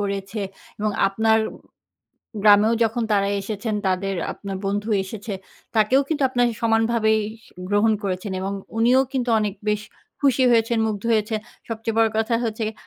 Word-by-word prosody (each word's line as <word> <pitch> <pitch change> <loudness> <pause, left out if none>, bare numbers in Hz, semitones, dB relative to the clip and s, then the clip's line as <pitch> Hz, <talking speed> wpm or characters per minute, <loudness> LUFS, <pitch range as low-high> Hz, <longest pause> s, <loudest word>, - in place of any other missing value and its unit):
করেছে 200 +1 -3 0.4
এবং 215 0 0 0.2
আপনার 220 +3 +2 1.0
গ্রামেও 210 +2 +6
যখন 230 +1 0
তারা 200 -1 +2
এসেছেন, 210 +2 -3
তাদের 190 +1 0 0.2
আপনার 195 -1 -6
বন্ধু 205 +2 -1
এসেছে, 205 +2 -6 0.4
তাকেও 225 +6 +4
কিন্তু 300 -2 0
আপনারা 245 -1 +2
সমানভাবেই 225 -1 +2 0.3
স - - -19 0.2
গ্রহণ 205 +2 +3
করেছেন 190 +1 -3
এবং 195 +1 -2 0.2
উনিও 245 +4 +5
কিন্তু 250 -2 -1
অনেক 210 -2 -1
বেশ 210 0 +1 0.4
খুশি 270 -2 +3
হয়েছেন, 230 0 +3
মুগ্ধ 210 -1 -3
হয়েছেন। 215 0 +1 0.3
সবচেয়ে 225 0 -3
বড় 225 -1 +4
কথা 225 +1 +1
হচ্ছে 220 0 -3
গে 220 - -5
220 Hz, 150 wpm, -23 LUFS, 205-230 Hz, 1.0 s, গ্রামেও